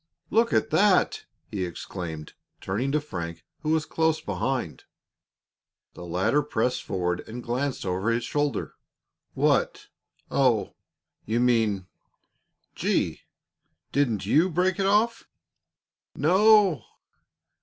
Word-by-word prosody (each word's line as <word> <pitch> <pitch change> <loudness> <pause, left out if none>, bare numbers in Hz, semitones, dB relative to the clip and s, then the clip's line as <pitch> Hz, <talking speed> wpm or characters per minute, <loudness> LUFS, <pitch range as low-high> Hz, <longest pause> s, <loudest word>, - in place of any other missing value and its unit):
"Look 230 +2 +3
at 220 - +1
that!" 200 -2 +3 0.3
he 95 -3 -2
exclaimed, 85 -3 -6 0.3
turning 120 +8 -2
to 150 - +2
Frank, 85 - -6
who 155 - -4
was 160 -1 +2
close 160 -1 +1
behind. 100 - -3 1.1
The - - -10
latter 90 - +1
pressed 125 -3 -1
forward 90 -2 -2
and 120 +2 -7
glanced 130 +2 -2
over 95 +4 -1
his 115 +1 0
shoulder. 145 -1 -1 0.6
"What? - - +1 0.4
Oh! 125 -6 +2 0.5
You 115 +2 +1
mean 110 -6 +2 0.9
Gee! - - -1 0.7
Didn't 120 -8 0
you 155 - +3
break 180 +2 +1
it 195 - +2
off?" 225 +3 +2 0.9
"No!" 190 - +4
125 Hz, 110 wpm, -26 LUFS, 95-160 Hz, 1.1 s, No